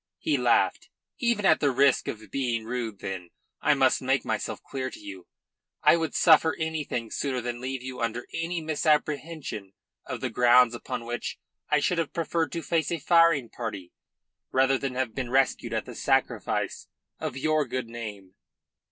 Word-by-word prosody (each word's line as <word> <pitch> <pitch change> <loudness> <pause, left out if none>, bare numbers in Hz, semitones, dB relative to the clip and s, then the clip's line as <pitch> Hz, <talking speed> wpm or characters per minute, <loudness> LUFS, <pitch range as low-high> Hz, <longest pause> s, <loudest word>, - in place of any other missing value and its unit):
He - - 0
laughed. - - +2 0.3
"Even 235 -5 +1
at 160 - +5
the 145 - +3
risk 135 +1 +3
of 110 -1 -6
being 120 -5 -1
rude, 115 -4 -4
then. 95 -3 -5 0.3
I - - +4
must - - +3
make - - +1
myself - - -2
clear 130 -1 -4
to - - -11
you. 95 -3 -10 0.6
I - - +7
would 160 -3 -2
suffer 160 -1 +5
anything 155 -8 -3
sooner 135 -3 -1
than 120 0 -4
leave 130 0 -4
you 130 0 -6
under 115 +1 -2
any 165 +1 -2
misapprehension 150 - -1 0.3
of - - -4
the - - -3
grounds 120 0 +5
upon 120 0 -5
which 120 0 -4 0.3
I 150 - +4
should 170 +4 +1
have 165 - -2
preferred 165 -1 -1
to 165 - -3
face 165 -2 0
a 170 - 0
firing 165 -5 +4
party 105 -7 -6 0.6
rather 135 +1 +3
than 135 -2 -3
have 130 -3 -1
been 130 -3 -3
rescued 135 +2 +1
at - - -1
the - - -8
sacrifice - - 0 0.3
of 130 - -4
your 155 +1 +1
good 125 -1 -3
name." 105 -5 -8
130 Hz, 170 wpm, -27 LUFS, 120-155 Hz, 0.6 s, I